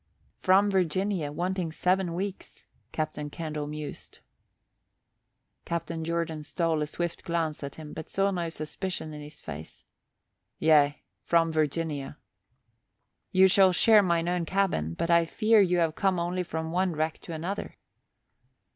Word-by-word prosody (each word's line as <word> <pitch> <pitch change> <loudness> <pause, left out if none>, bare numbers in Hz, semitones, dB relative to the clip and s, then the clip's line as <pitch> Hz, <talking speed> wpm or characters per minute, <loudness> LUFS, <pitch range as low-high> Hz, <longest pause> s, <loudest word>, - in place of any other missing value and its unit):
"From 195 +2 +4
Virginia, 185 -3 0
wanting 175 +1 -2
seven 180 +1 +1
weeks," 195 +1 -5 0.3
Captain 150 -1 -3
Candle 155 -2 -4
mused. 150 0 -7 1.5
Captain 165 -1 -3
Jordan 165 -1 -2
stole 160 0 -1
a 150 - -1
swift 170 +2 -4
glance 165 -4 -1
at 140 - -6
him 155 -2 -9
but 160 - -7
saw 195 +1 +1
no 175 -3 -2
suspicion 160 +1 -5
in 150 - -7
his 150 +1 -11
face. 80 +1 -9 0.7
"Yea, 150 -2 +4 0.2
from 165 -1 +2
Virginia." 155 -2 -1 1.1
"You 190 +1 +6
shall 190 0 +5
share 215 +3 +6
mine 170 -3 +1
own 175 -1 0
cabin 165 - 0
but 170 - -1
I 170 0 +5
fear 215 +5 +4
you 180 -2 +3
have 165 -2 +2
come 190 +1 +1
only 175 +2 -1
from 160 -2 -4
one 180 0 +1
wreck 155 +1 -1
to 170 - -8
another." 175 +6 -4
170 Hz, 140 wpm, -28 LUFS, 155-185 Hz, 1.5 s, You